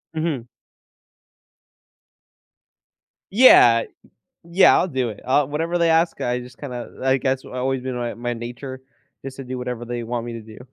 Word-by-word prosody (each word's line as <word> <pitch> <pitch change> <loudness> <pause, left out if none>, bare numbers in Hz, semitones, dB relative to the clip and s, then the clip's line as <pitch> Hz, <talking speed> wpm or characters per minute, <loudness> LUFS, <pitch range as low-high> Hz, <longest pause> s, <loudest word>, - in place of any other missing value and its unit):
Mhm. 155 -7 -2 2.8
Yeah. 120 - +7 0.7
Yeah, 180 +3 +6
I'll - - +1
do 130 -5 -1
it. 110 - -8
I'll 135 +1 +2
whatever 165 +4 -2
they 170 -1 +3
ask, 165 +1 +2
I 125 0 -1
just 125 0 -11
kinda 125 -4 -8
I 130 0 +3
guess, 130 -1 -1
that's - - -28
always 130 0 -2
been 130 -1 -4
my 120 -1 -3
my 120 +1 -4
nature, 125 +3 -7 0.4
just 135 -1 -7
to 135 - -6
do 130 0 -5
whatever 125 -1 -5
they 120 0 -5
want 120 0 -3
me 120 -1 -6
to 115 - -6
do. 110 0 -13
130 Hz, 170 wpm, -22 LUFS, 120-140 Hz, 2.8 s, Yeah